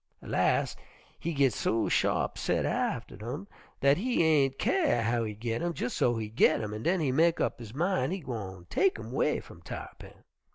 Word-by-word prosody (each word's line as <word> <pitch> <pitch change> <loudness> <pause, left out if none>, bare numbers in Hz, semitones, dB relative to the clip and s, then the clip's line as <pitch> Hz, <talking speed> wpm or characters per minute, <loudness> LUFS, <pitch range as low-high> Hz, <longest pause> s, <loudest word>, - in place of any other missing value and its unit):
Las' - - +1 0.4
he 170 - -2
git 140 -5 +3
so 115 - 0
sharp - - +1
set - - 0
atter 105 - -2
'em 200 - -9 0.3
dat 140 +1 +5
he 240 -1 +1
ain' 150 -4 +4
kyare 320 - +2
how 115 +1 +1
he 105 -2 -4
git 115 +2 -3
'em, 175 0 -1
jes' 125 - -2
so 120 - +2
he 110 -1 -3
git 110 - +3
'em, 105 -1 -4
an' 110 - -5
den 180 +8 +1
he 140 -4 +1
mek 165 +5 +3
up - - -1
his 115 0 -9
min' 155 -5 +1
he 190 - -2
gwine 100 - -6
tek 390 -1 +2
'em - - -8
'way - - +1
f'um - - -14
Tarr'pin. - - -9
130 Hz, 200 wpm, -29 LUFS, 115-170 Hz, 0.4 s, dat